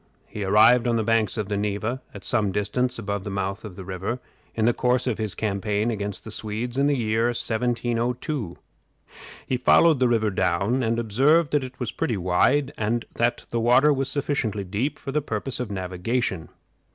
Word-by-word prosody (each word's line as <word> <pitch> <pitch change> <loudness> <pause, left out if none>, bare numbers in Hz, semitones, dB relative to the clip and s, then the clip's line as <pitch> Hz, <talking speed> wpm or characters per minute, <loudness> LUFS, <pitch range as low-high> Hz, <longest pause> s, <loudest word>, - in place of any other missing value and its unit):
He 105 - -6
arrived 115 +5 +5
on 120 - +2
the 110 - +1
banks 115 -1 +1
of 105 -3 -2
the 105 - -2
Neva, 105 +5 -2
at - - -10
some 110 -6 +1
distance 115 +6 -1
above 100 -3 -3
the 105 - -5
mouth 95 0 -3
of 105 -5 -8
the 95 - -8
river, 95 +6 -4 0.4
in 110 - +1
the 120 - +4
course 125 +1 +1
of 120 -4 -1
his 110 -4 -3
campaign 105 +1 -1
against 105 -2 -4
the 110 - -8
Swedes 115 +5 -3
in 140 - +3
the 145 -1 +2
year 110 -1 +1
1702. 120 - -1 0.9
He 130 - -1
followed 155 +4 +5
the 130 - +4
river 110 -3 +2
down, 100 +7 +1
and 115 -1 0
observed 135 +9 +3
that 145 -2 +2
it 125 0 -9
was 125 -4 -2
pretty 130 -10 -1
wide, 110 +11 +2
and 115 +2 0
that 120 +1 0
the 115 - 0
water 125 +6 +5
was 135 -1 -2
sufficiently 135 -8 -1
deep 105 +10 -2
for 135 - -6
the 150 +2 +1
purpose 125 0 -3
of 125 -3 -3
navigation. 95 +1 -2
115 Hz, 190 wpm, -24 LUFS, 105-125 Hz, 0.9 s, arrived